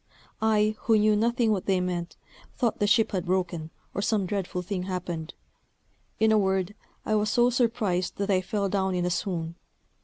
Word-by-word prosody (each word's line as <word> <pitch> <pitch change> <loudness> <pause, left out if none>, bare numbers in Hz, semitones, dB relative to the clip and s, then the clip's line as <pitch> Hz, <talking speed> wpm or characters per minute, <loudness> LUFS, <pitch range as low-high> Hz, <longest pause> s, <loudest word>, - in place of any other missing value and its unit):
I, 215 -1 +3
who 225 -2 +5
knew 215 0 +4
nothing 235 +1 +2
what 195 -4 -1
they 190 -2 +3
meant, 175 -1 -3 0.4
thought 235 -4 0
the 205 - +2
ship 220 +2 +3
had 185 -2 -2
broken, 175 -3 -1 0.2
or - - -2
some 205 -2 +1
dreadful 180 -1 -3
thing 185 0 -3
happened. 175 -3 -4 0.8
In 220 0 +4
a 215 - +5
word, 190 0 0 0.3
I 215 - 0
was 210 0 +2
so 240 +3 +3
surprised 220 -7 0
that 200 0 -1
I 185 -1 +3
fell 200 +1 -1
down 190 -1 0
in 175 -1 0
a 180 - 0
swoon. 170 -2 -3
195 Hz, 185 wpm, -27 LUFS, 180-215 Hz, 0.8 s, who